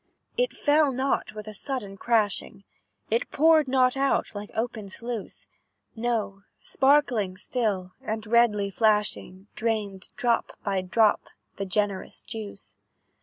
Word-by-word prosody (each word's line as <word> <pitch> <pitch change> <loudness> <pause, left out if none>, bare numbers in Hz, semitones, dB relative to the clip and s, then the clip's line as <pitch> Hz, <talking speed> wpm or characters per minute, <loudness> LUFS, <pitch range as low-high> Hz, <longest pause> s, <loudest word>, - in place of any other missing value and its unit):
"It - - +1
fell 295 -1 +3
not 265 +2 -1
with 215 -1 -7
a 215 - -8
sudden 210 -3 -3
crashing, 205 -2 0 0.5
It 230 +2 +1
poured 315 -1 +4
not 255 -1 +3
out 275 0 +1
like 205 0 -6
open 225 -3 -3
sluice; 230 +1 -5 0.5
No, 225 -4 -2 0.2
sparkling 255 -9 +2
still, 195 -4 -2
and 220 0 -4
redly 210 -3 +3
flashing, 210 -3 0
Drained, 215 -4 -2
drop 235 -2 0
by 195 -3 0
drop, 210 +4 +2 0.3
the 195 - -3
generous 200 0 -2
juice. 210 -3 -8
220 Hz, 120 wpm, -26 LUFS, 200-250 Hz, 0.5 s, poured